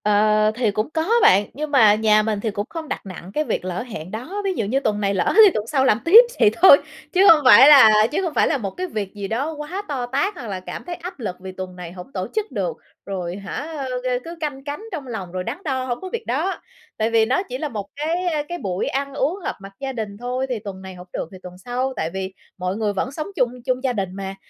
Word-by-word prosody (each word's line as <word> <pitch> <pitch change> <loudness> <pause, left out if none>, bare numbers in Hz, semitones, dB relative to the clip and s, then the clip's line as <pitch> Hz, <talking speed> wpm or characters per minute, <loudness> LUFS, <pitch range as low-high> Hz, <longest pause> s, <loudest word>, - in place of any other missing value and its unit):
Ờ, 215 +1 +3
thì 235 -3 +1
cũng 215 +6 -2
có 320 0 -1 0.2
bạn, 200 +2 +5
nhưng 300 +2 -5
mà 220 -7 +6
nhà 215 0 +3
mình 215 -1 -1
thì 220 +1 -2
cũng 205 +1 -3
không 325 -2 -6
đặt - - -5
nặng 185 -1 -9
cái 305 - 0
việc 240 - -3
lỡ 185 0 -3
hẹn 185 -8 -8
đó. 260 - -5
Ví 385 - +1
dụ 225 - -2
như 255 +7 +1
tuần 215 -6 -1
này 200 -1 +1
lỡ 185 -3 +1
thì 395 - +6
tuần 215 +1 -3
sau 265 0 +1
làm 220 -4 +3
tiếp 380 +7 +10 0.2
vậy - - +6
thôi, 365 -7 +10 0.4
chứ 380 +1 +5
hông 310 - +7
phải 255 +1 +9
là 220 -7 +8
chứ 345 +6 0
không 345 -5 -2
phải - - +3
là 310 - +1
một 200 -6 -4
cái 370 - -4
việc 210 - -4
gì 200 -1 -5
đó 270 +10 -2
quá 305 +6 -5
to 265 -4 -3
tát 280 +11 -1
hoặc 250 -8 -8
là 195 -3 -4
cảm 185 - -8
thấy 350 0 -5
áp 355 -1 -9
lực 205 -7 -4
vì 190 0 -8
tuần 185 -1 -7
này 175 -2 -8
hổng 180 +7 -11
tổ 185 0 -3
chức 435 -1 -2
được, - - -3 0.3
rồi, 180 -3 -4
hả, 195 -1 -8 0.5
a, 250 -1 0
cứ 335 +1 -8
canh 285 -3 -4
cánh 290 +5 -5
trong 300 -7 -6
lòng, 195 -7 -6
rồi 185 0 -3
đắn 230 +8 -4
đo, 260 -5 -2
hông 240 -2 -3
có 375 - -6
việc 465 -1 -4
đó. 320 +10 -1 0.4
Tại 220 +1 +1
vì 225 -1 +3
nó 260 - +1
chỉ 255 - -4
là 300 +2 -3
một 210 -5 -5
cái, 325 +5 -2
a, 310 -4 0
cái 350 - -3
buổi 190 - -3
ăn 275 +1 -2
uống 290 +7 -1
họp - - -2
mặt 195 0 -11
gia 270 -1 -4
đình 215 -4 -5
thôi, 250 +3 -2
thì 245 -3 -2
tuần 195 -2 -8
này 190 -1 -9
hổng 180 0 -12
được - - -4
thì 190 - -10
tuần 180 0 -10
sau. 250 +6 -3
Tại 160 - -2
vì 190 0 -4 0.2
mọi 185 +1 -2
người 215 -2 -1
vẫn 200 +6 -2
sống 310 +4 -5
chung, 245 -8 +1
chung 255 -1 -1
gia 260 -2 +1
đình 195 -5 -2
mà, 195 0 -6
235 Hz, 275 wpm, -22 LUFS, 200-295 Hz, 0.5 s, tiếp